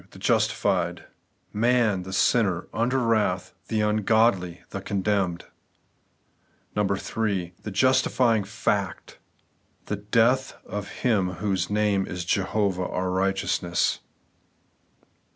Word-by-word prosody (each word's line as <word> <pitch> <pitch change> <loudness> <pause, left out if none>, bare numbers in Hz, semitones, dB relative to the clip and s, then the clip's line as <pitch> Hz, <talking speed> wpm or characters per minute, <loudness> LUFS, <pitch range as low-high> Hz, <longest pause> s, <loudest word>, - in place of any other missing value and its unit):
The - - -15
justified; - - +1 0.3
— - - -44
Man, 115 -3 +2
the 95 +1 -8
sinner, 95 -3 +2
under 120 +3 +1
wrath, 110 -7 +1
the 110 -1 0
ungodly, 105 -4 +2
the 100 - -5
condemned. 95 -3 -1 1.3
3. 100 -2 -1
The - - -6
justifying 125 0 +3
fact; 100 -1 -2 0.3
— - - -41
^The 105 0 -4
death 125 +4 +3
of 100 +1 -5 0.2
Him 100 -7 +2
whose 95 -1 -1
name 105 -2 +1
is 90 -2 -5
Jehovah 95 -1 0
our 90 0 -2
righteousness. 95 -2 0
100 Hz, 105 wpm, -25 LUFS, 95-110 Hz, 1.3 s, justifying